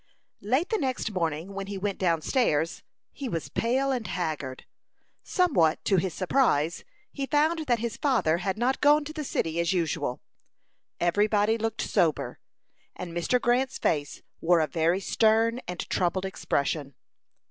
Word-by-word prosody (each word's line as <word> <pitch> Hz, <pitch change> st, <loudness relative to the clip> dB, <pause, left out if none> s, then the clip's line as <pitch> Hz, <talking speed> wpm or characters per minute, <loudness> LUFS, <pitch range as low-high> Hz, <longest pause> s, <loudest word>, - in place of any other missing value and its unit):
Late 260 Hz, -, +1 dB
the 440 Hz, -, 0 dB
next 260 Hz, -6 st, -2 dB
morning, 170 Hz, 0 st, -2 dB
when 195 Hz, 0 st, -5 dB
he 200 Hz, 0 st, -5 dB
went 200 Hz, 0 st, -3 dB
down 165 Hz, -4 st, +1 dB
stairs, 165 Hz, -, +1 dB, 0.3 s
he 275 Hz, -3 st, -5 dB
was 165 Hz, -6 st, -3 dB
pale 265 Hz, +4 st, 0 dB
and 245 Hz, -5 st, -2 dB
haggard. 155 Hz, -8 st, -4 dB, 0.6 s
Somewhat 220 Hz, -, +2 dB
to 195 Hz, -, +3 dB
his 180 Hz, +1 st, 0 dB
surprise, 170 Hz, -, +1 dB, 0.3 s
he 275 Hz, -1 st, -4 dB
found 310 Hz, +2 st, +1 dB
that 240 Hz, -2 st, +3 dB
his 230 Hz, -1 st, -4 dB
father 225 Hz, -, +2 dB
had 190 Hz, +2 st, -2 dB
not 250 Hz, +3 st, 0 dB
gone 295 Hz, +1 st, +5 dB
to 310 Hz, -, -7 dB
the 310 Hz, -1 st, -4 dB
city 165 Hz, -, -1 dB
as 170 Hz, +1 st, +1 dB
usual. 160 Hz, -7 st, -1 dB, 0.8 s
Every 190 Hz, +5 st, +2 dB
body 210 Hz, +1 st, +2 dB
looked 225 Hz, 0 st, -2 dB
sober, 160 Hz, -6 st, 0 dB, 0.6 s
and 170 Hz, -2 st, -7 dB
Mr. 175 Hz, +9 st, +1 dB
Grant's 250 Hz, +2 st, +1 dB
face 145 Hz, -3 st, -1 dB, 0.2 s
wore 170 Hz, +1 st, +3 dB
a 160 Hz, -, +3 dB
very 170 Hz, +4 st, +1 dB
stern 225 Hz, +3 st, +2 dB
and 180 Hz, 0 st, -5 dB
troubled 185 Hz, +1 st, 0 dB
expression. 140 Hz, -6 st, -2 dB
195 Hz, 160 wpm, -27 LUFS, 165-250 Hz, 0.8 s, gone